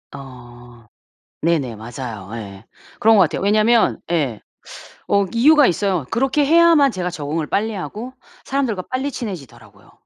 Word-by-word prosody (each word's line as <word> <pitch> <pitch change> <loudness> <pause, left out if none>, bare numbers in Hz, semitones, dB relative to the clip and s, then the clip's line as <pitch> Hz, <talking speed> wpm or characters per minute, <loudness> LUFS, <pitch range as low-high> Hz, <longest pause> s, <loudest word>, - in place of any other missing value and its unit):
어. 120 -3 -13 0.6
네네 145 -9 0
맞아요. 110 -3 -8
예. 100 -2 -9 0.4
그런 220 0 +5
것 195 - +6
같아요. 165 - -1
왜냐면 215 +3 +3
예 140 -10 -1 0.7
어 200 0 +3
이유가 290 +4 +5
있어요. 180 -4 0
그렇게 270 +4 +1
해야만 325 -4 +5
제가 180 -2 -3
적응을 155 -1 -4
빨리 220 +2 -1
하고 220 +6 -6 0.3
사람들과 255 -9 -2
빨리 265 +3 -2
친해지더라고요. 120 - -9
180 Hz, 310 characters per minute, -19 LUFS, -, 0.7 s, 것